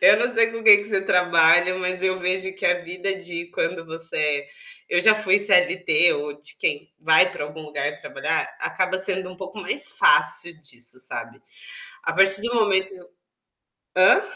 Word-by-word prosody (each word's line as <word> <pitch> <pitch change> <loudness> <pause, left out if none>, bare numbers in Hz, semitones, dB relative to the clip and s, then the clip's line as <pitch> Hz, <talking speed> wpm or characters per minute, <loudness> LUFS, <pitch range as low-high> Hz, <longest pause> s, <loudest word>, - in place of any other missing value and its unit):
Eu - - +7
não 245 - 0
sei 230 -2 +1
com 230 -1 -8
quem 205 -2 +9
que 205 - -6
você 200 -2 -2
trabalha 180 -1 +3
mas 185 0 -3
eu 185 0 0
vejo 185 +1 -2
que - - -10
a 180 0 +2
vida 180 +3 -5
de 175 -2 -7
quando 165 -1 -3
você 165 0 -7
é 145 -2 0 0.4
eu 175 - +1
já 215 +4 +5
fui 205 -2 +2
CLT 180 -4 +3
ou 145 0 -6
de 150 - -11
quem 145 - -3
vai 160 +3 +4
pra 145 - -6
algum 150 +2 -10
lugar 145 -1 -4
trabalhar, 150 +4 -3 0.2
acaba 185 0 -2
sendo 190 -1 -1
um 185 - -13
pouco 190 +2 -9
mais 275 +10 -4
fácil - - +3
disso 120 -4 -9
sabe? 115 -2 -6 0.6
A - - -2
partir 195 +1 +3
do 235 - -3
momento 195 -4 +1 1.0
Hã? - - +5
180 Hz, 180 wpm, -22 LUFS, 160-195 Hz, 1.0 s, quem